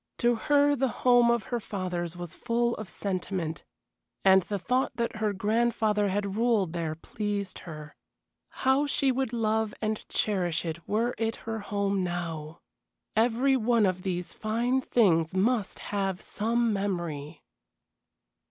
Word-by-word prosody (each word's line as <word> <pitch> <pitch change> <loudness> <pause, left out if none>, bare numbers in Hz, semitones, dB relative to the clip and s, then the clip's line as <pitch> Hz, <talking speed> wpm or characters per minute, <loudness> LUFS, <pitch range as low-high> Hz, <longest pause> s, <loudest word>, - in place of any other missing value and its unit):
To 240 0 +3
her 290 +4 +3
the 265 0 +1 0.2
home 245 -1 +6
of 235 -2 +2
her 240 - +1
fathers 180 -5 -4
was 175 -2 -6
full 235 0 0
of 215 -3 -7
sentiment, 185 -4 -3 0.6
and 190 0 +7
the 205 +3 -3
thought 250 +7 0
that 235 -1 -2
her 215 -1 +1
grandfather 210 0 +1
had 200 0 -1
ruled 220 -7 +2
there 165 -2 -2
pleased 200 +3 -4
her. 150 -1 -9 0.7
How 270 +3 +4
she 275 -1 +2
would 260 -1 -1
love 220 -2 0
and 215 -1 -2
cherish 180 -5 0
it 165 0 -5
were 230 +4 +1
it 225 0 0
her 225 0 -3
home 200 -2 -1
now! 165 -3 -4 0.5
Every 240 +4 +3
one 235 -2 +3
of 185 -1 0
these 180 -2 -3
fine 235 +4 0
things 180 -10 +2
must 210 +2 +1 0.2
have 195 -2 0
some 230 +1 0
memory. 170 -7 -3
210 Hz, 145 wpm, -28 LUFS, 180-235 Hz, 0.7 s, and